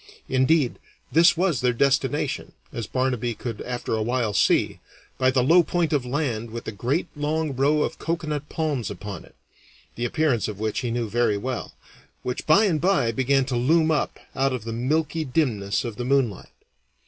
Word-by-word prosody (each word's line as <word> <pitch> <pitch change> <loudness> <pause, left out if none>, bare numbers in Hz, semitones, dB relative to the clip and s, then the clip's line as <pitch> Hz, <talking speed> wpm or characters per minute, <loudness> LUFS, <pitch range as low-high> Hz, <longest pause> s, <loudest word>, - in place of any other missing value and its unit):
Indeed, 130 +1 +2 0.3
this 170 +1 +5
was 175 -5 +1
their 125 -1 +2
destination, 140 +2 0 0.2
as 115 -5 -4
Barnaby 125 -3 -1
could 115 -2 -6
after 125 -2 -4
a 110 - 0
while 120 -1 0
see, 95 - +2 0.4
by 130 0 +4
the 130 -1 +2
low 165 +7 +6
point 170 -1 0
of 135 -4 0
land 125 -5 -2
with 115 +1 -7
a - - -2
great 125 - -1
long 150 0 -1
row 145 +3 +3
of 160 - -4
coconut 155 -3 -3
palms 145 -8 -2
upon 100 0 -7
it - - -21 0.6
(the 120 - -3
appearance 125 -3 +1
of 105 -2 -6
which 110 -1 -1
he 125 - -2
knew 115 0 -1
very 115 -1 +1
well), 125 +3 -4 0.5
which 125 - -4
by 195 +8 +6
and 160 -7 +1
by 170 -11 +2
began 135 +3 +2
to 130 -2 -2
loom 155 +6 +3
up 150 - 0 0.2
out 135 0 +1
of 125 -4 -4
the 115 0 -5
milky 155 +7 0
dimness 125 -9 0
of 115 -3 -5
the 125 - -3
moonlight. 130 -6 0
130 Hz, 185 wpm, -24 LUFS, 115-150 Hz, 0.6 s, low